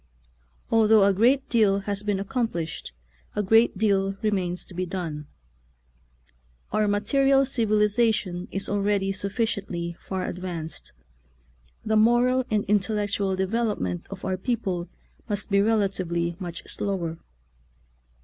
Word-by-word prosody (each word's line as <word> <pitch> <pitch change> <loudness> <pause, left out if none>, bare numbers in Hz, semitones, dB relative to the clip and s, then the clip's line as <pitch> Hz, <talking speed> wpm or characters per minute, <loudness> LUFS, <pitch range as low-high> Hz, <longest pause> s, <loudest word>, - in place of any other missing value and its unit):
Although 220 -2 +5
a 200 0 +4
great 250 +7 +3
deal 205 -4 +3
has 200 0 -2
been 205 -2 -1
accomplished, 195 - -3 0.4
a 210 - 0
great 225 +1 +4
deal 195 -2 +1
remains 185 -4 -1
to - - -11
be 180 +1 -2
done. 165 -5 -5 1.4
Our 215 0 +2
ma 205 0 +2
teria] 270 +4 +3
civilization 215 -5 +1
is 195 - -3
already 200 -1 +1
sufficiently 195 -4 -2
far 190 -1 -4
advanced; 175 -3 -5 0.9
the 220 0 +2
moral 240 +3 +4
and 210 -1 +1
intellectual 205 -1 0
development 190 - -1
of 195 -1 -8
our 185 - -1
people 190 -5 -2 0.4
must 205 0 -2
be 200 - +4
rela 215 0 +3
tively 170 -3 -2
much 175 -2 -6
slower. 170 -5 -3
200 Hz, 120 wpm, -25 LUFS, 185-220 Hz, 1.4 s, Although